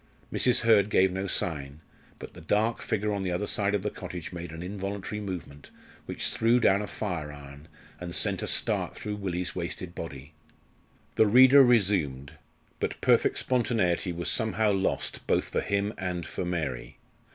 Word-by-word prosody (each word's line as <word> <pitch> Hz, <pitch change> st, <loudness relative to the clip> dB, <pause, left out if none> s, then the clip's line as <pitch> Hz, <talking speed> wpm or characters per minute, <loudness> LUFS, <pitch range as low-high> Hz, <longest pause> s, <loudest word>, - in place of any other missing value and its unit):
Mrs. 125 Hz, -2 st, +3 dB
Hurd 110 Hz, -3 st, +4 dB
gave 95 Hz, -2 st, +4 dB
no 95 Hz, +1 st, -3 dB
sign, 75 Hz, -6 st, -2 dB, 0.4 s
but -, -, -10 dB
the -, -, -12 dB
dark 110 Hz, +3 st, 0 dB
figure 105 Hz, 0 st, -1 dB
on 100 Hz, -, -2 dB
the 95 Hz, -2 st, -2 dB
other 90 Hz, +4 st, -1 dB
side 100 Hz, -1 st, +1 dB
of 100 Hz, -, -2 dB
the 105 Hz, -, -2 dB
cottage 90 Hz, -2 st, -7 dB
made 85 Hz, -1 st, -6 dB
an 80 Hz, +2 st, -7 dB
involuntary 100 Hz, +2 st, -5 dB
movement, 85 Hz, -8 st, -7 dB, 0.4 s
which -, -, -2 dB
threw 115 Hz, +2 st, +3 dB
down 100 Hz, -4 st, +3 dB
a 105 Hz, -, -4 dB
fire 85 Hz, -10 st, -4 dB
iron, 70 Hz, +1 st, -12 dB, 0.3 s
and 85 Hz, -1 st, -5 dB
sent -, -, +1 dB
a -, -, -3 dB
start -, -, 0 dB
through 105 Hz, -1 st, -5 dB
Willie's 90 Hz, -1 st, -3 dB
wasted 85 Hz, 0 st, -5 dB
body. 70 Hz, -2 st, -8 dB, 0.8 s
The 110 Hz, -, +5 dB
reader 130 Hz, +5 st, +8 dB
resumed; 95 Hz, -, +2 dB, 0.5 s
but -, -, -3 dB
perfect -, -, +3 dB
spontaneity 110 Hz, -8 st, 0 dB
was 85 Hz, 0 st, -5 dB
somehow 110 Hz, -1 st, +1 dB
lost 95 Hz, -1 st, -1 dB
both -, -, +1 dB
for -, -, -1 dB
him 100 Hz, +1 st, -1 dB
and 90 Hz, -2 st, -3 dB
for 90 Hz, -, -4 dB
Mary. 80 Hz, -8 st, -4 dB
95 Hz, 170 wpm, -28 LUFS, 85-105 Hz, 0.8 s, reader